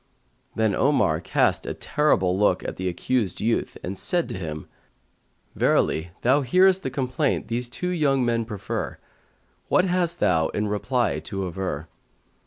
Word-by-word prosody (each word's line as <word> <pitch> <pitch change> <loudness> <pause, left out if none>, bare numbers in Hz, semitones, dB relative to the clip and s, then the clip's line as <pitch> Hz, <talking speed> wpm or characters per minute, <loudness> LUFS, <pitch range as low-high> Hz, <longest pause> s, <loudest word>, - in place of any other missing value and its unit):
Then 110 -2 +2
Omar 105 - +2
cast - - +1
a - - -3
terrible 95 -12 +1
look 105 +2 +2
at - - -5
the 95 - -2
accused 95 +2 -1
youth 115 +2 -1
and 95 - -4
said 175 - 0
to - - -4
him, 75 -3 -6 0.9
"Verily 80 +3 +1
thou 135 +4 +4
hearest 185 +8 +4
the 130 - -3
complaint 130 +2 -1
these 120 +1 -1
two 180 +8 -3
young 140 -7 +2
men 115 -1 +1
prefer; 105 -4 -4 0.7
what 185 - +3
hast 175 -2 0
thou 80 -1 +3
in 105 +1 -2
reply 120 +4 0
to 95 -4 -4
aver?" 85 -4 -4
120 Hz, 150 wpm, -24 LUFS, 95-145 Hz, 0.9 s, thou